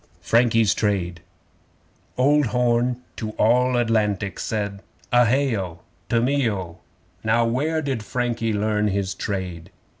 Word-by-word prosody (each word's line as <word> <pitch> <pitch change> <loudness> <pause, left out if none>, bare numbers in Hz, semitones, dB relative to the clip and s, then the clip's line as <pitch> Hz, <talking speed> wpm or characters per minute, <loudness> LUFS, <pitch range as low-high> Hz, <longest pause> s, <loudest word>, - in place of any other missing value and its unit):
Frankie's 115 +2 +3
Trade 90 -5 -1 1.0
Old 145 +2 +3
Horn 125 +1 +1
to 110 -2 -4
All 125 +3 +3
Atlantic 105 -4 0
said: 100 -2 -3 0.3
(A 120 -1 +5
hay 135 0 +2
O! 90 -5 -5 0.3
To 115 - +3
me 130 0 +2
O!) 90 -4 -5 0.4
'Now 115 +2 +2
where 150 +7 0
did 135 -5 -2
Frankie 115 0 -2
learn 105 0 +1
his 100 -1 -1
trade? 90 -4 -4
115 Hz, 125 wpm, -23 LUFS, 100-125 Hz, 1.0 s, A